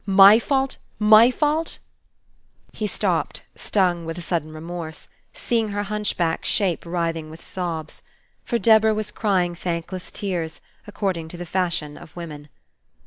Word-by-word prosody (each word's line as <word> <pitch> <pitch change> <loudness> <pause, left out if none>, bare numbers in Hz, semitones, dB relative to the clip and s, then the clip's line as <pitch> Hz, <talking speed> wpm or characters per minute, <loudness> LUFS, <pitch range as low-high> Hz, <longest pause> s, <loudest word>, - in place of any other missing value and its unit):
My 195 +2 +8
fault? 270 +1 0 0.2
My 215 +2 +7
fault?" 300 +4 0 1.0
He 215 - -2
stopped, - - -1
stung 180 -4 +1
with 165 +1 -5
a - - -5
sudden 165 -3 -2
remorse, 160 0 -7 0.2
seeing 225 -3 -1
her 205 0 -2
hunchback 205 -5 -1
shape 180 -4 +1
writhing 165 -2 -2
with 160 +1 -12
sobs. 165 -4 -4 0.4
For 235 - 0
Deborah 220 -1 +5
was 215 -1 -3
crying 185 -5 +1
thankless 175 +1 -4
tears, 175 -5 -3 0.3
according 190 -5 -2
to 175 - -9
the 175 - -6
fashion 170 -4 -1
of 155 - -14
women. 150 -4 -8
180 Hz, 140 wpm, -23 LUFS, 165-210 Hz, 1.0 s, My